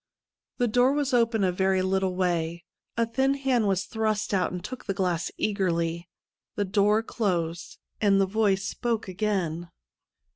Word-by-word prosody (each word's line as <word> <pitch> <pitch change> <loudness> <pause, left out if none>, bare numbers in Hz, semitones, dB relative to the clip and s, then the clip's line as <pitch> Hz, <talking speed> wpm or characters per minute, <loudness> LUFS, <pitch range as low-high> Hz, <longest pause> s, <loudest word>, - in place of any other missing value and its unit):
The 245 - +2
door 245 +4 +3
was 285 -2 -1
opened 230 -4 +3
a 185 - +2
very 190 +1 +1
little 190 -1 0
way. 170 -2 -1 0.3
A 230 - +3
thin 265 +4 +1
hand 260 -5 +1
was 190 -1 +1
thrust 215 -1 -1
out 185 -2 +1
and 180 -1 -5
took 255 -1 -7
the 195 - -2
glass 180 -3 0
eagerly. 170 -4 -1 0.5
The 205 - 0
door 210 +3 +2
closed, 175 -7 -2 0.2
and 200 -2 +4
the 195 - +4
voice 195 -1 +1
spoke 230 +1 -2
again. 180 -4 -2
195 Hz, 155 wpm, -26 LUFS, 180-225 Hz, 0.5 s, and